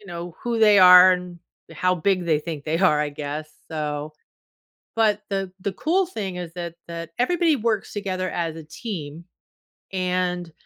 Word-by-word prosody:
you 205 - -17
know, 175 -1 -7
who 235 -1 -1
they 210 -2 +6
are, 180 0 +9
and 180 -1 -5 0.3
how 185 0 +1
big 180 +1 0
they 155 -2 +3
think 155 -3 -6
they 160 +1 -1
are, 155 -6 +3
I 150 -1 -1
guess, 150 +1 -6 0.2
so 150 -1 -4 0.8
but 215 -2 +2
the 195 -2 -2
the 200 - -2
cool 360 - +1
thing 195 - -5
is 175 -2 -6
that 170 -2 -6
that 170 0 -7
everybody 330 +3 +2
works 220 -3 -1
together 185 -3 -3
as 165 -2 -2
a 160 - -8
team, 160 -3 -7 0.7
and, 180 -2 -1
180 Hz, 170 wpm, -23 LUFS, 160-200 Hz, 0.8 s, are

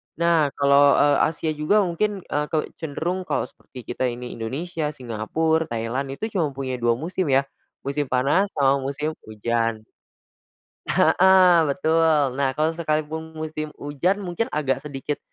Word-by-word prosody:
Nah, 170 -2 +3
kalau, 140 0 +5
eee, 145 -1 +4
Asia 160 0 -2
juga 155 +8 +2
mungkin, 195 +2 -1
eee, 150 0 -2
ke 160 - -1 0.2
cenderung, 175 +4 -3
kalau - - 0
seperti 125 -2 -12
kita 130 - -1
ini 125 0 -5
Indonesia, 155 +7 -3
Singapura, 150 +5 -1
Thailand, 120 +2 -3
itu 220 +8 -4
cuma 175 -7 +1
punya 130 -2 -4
2 120 -1 +2
musim 170 +6 -3
ya, 135 0 +3 0.4
musim 140 +2 -1
panas 140 +11 +2
sama 140 -1 +3
musim 150 +3 -3
hujan 115 +1 -1 1.2
heeh, 185 -1 +6
betul. 155 -3 +2
Nah, 140 -1 +2
kalau 155 +1 +2
sekalipun 160 0 -2
musim 155 -1 -5
hujan 150 +7 0
mungkin 180 +4 -2
agak 140 -3 0
sedikit, 145 0 -4
150 Hz, 145 wpm, -23 LUFS, 135-165 Hz, 1.2 s, heeh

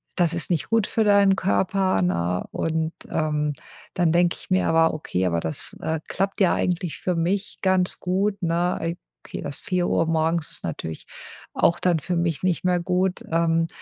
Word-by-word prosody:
das 175 -3 +2
ist - - -2
nicht 170 -4 -1
gut 225 -3 +2
für 220 - +1
deinen 200 -2 +5
Körper“, 190 - +1
ne, 90 0 0
und, 160 0 -1 0.2
ähm, 150 -1 0 0.4
dann 175 -3 +2
denke 175 0 +3
ich - - -14
mir 185 0 +2
aber: 165 0 +4
„Okay, 95 -11 -2
aber 85 -1 0
das, 80 -1 -3
äh, 160 -1 -1
klappt 195 +2 -2
ja 185 - +5
eigentlich 175 -2 -1
für 180 -2 -1
mich 190 +5 -1
ganz 185 -1 +1
gut“, 195 +3 0
ne? 175 +1 +1
Ei 165 +1 -2 0.3
okay, - - -6
das 140 - -5
4:00 175 -2 0
morgens 160 0 0
ist - - -11
natürlich 80 0 -5 0.5
auch 170 - +2
dann 175 -3 +2
für 175 +4 -3
mich 170 -1 -1
nicht 180 -2 0
mehr 180 -1 +2
gut, 180 +1 0
ähm, 165 0 +2
170 Hz, 180 wpm, -24 LUFS, 160-185 Hz, 0.5 s, deinen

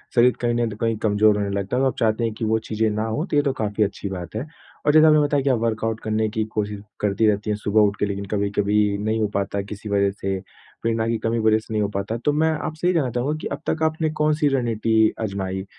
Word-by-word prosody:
शरीर 125 +1 +6
कहीं 120 -1 +1
न 120 -1 0
तो 105 - -7
कहीं 115 0 0
कमज़ोर 105 -1 +3
होने 100 -1 -1
लगता 100 +3 -2
है। 130 - +2
तब - - +3
आप - - -2
चाहती 110 +1 +1
हैं 115 - -1
कि 115 - -2
वो 110 +1 +2
चीज़ें 110 0 -1
ना 105 +1 -1
हो 110 +9 -2
तो 170 - -3
ये - - +6
तो 140 - +1
काफ़ी 105 0 +1
अच्छी 100 0 -3
बात 90 +1 -7
है। 115 - -3 0.4
और 150 - +4
जैसे 155 0 +7
आपने 155 -1 +6
बताया 145 -2 +1
कि 140 - +1
आप 125 - +2
वर्कआउट 115 -1 -1
करने 110 0 0
की 110 0 -1
कोशिश 105 -1 -2 0.2
करती 105 +1 +1
रहती 105 0 0
हैं 105 - 0
सुबह 105 +1 +2
उठ 100 -1 +3
के, - - +2
लेकिन 100 0 -4
कभी-कभी 100 0 +1
नहीं 110 +2 -1
हो 105 - +2
पाता 100 0 -1
किसी 105 +1 -8
वज़ह 100 -1 +2
से, 95 -1 -3 0.4
प्रेरणा 115 0 0
की 115 0 0
कमी 115 +1 -1
की 110 - -1
वज़ह 110 0 +4
से 110 0 -9
नहीं 105 - +1
हो 100 - +1
पाता। 100 +3 -3
तो 145 - +3
मैं 160 +2 +2
आपसे 155 +2 -3
ये 180 - +3
जानना 135 -7 +1
चाहूँगा 135 +6 -1
कि - - -3
अब 150 - -4
तक 160 - 0
आपने 160 0 +1
कौन-सी 150 0 +2
रणनीति 110 -2 +2
आज़माई 95 -2 -3
110 Hz, 270 wpm, -23 LUFS, 105-120 Hz, 0.4 s, जैसे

